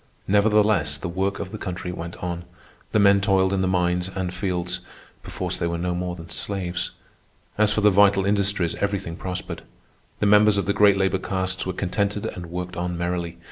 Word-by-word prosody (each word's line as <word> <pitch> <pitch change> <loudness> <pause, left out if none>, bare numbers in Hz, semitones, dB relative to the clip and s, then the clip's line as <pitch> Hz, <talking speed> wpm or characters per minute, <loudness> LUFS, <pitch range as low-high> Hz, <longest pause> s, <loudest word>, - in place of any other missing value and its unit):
Nevertheless 105 -7 +3
the 90 - -5
work 95 +3 -1
of 95 -1 -6
the 110 - -6
country 90 -1 -4
went 85 -1 -6
on. 85 -1 -3 0.5
The - - +2
men 100 -1 +5
toiled 95 -1 +2
in 95 - +1
the 95 - +1
mines 90 0 +1
and 95 -2 -3
fields—perforce 90 -1 -5
they 85 - -1
were 85 0 -2
no 90 +1 -1
more 90 0 -3
than 85 -1 -11
slaves. 95 -3 -2 0.7
As 105 0 +3
for 105 - +1
the 105 0 +6
vital 100 0 +5
industries, 100 -4 +1
everything 100 -4 -2
prospered. 90 +1 -5 0.6
The - - +1
members 105 0 +5
of 100 - 0
the 100 - +1
great 100 -1 +5
labor 95 -1 +1
castes 95 -1 -2
were 95 - -1
contented 100 +3 -1
and 90 -1 -5
worked 90 +1 -5
on 90 0 -3
merrily. 85 -1 -2
95 Hz, 185 wpm, -24 LUFS, 90-100 Hz, 0.7 s, the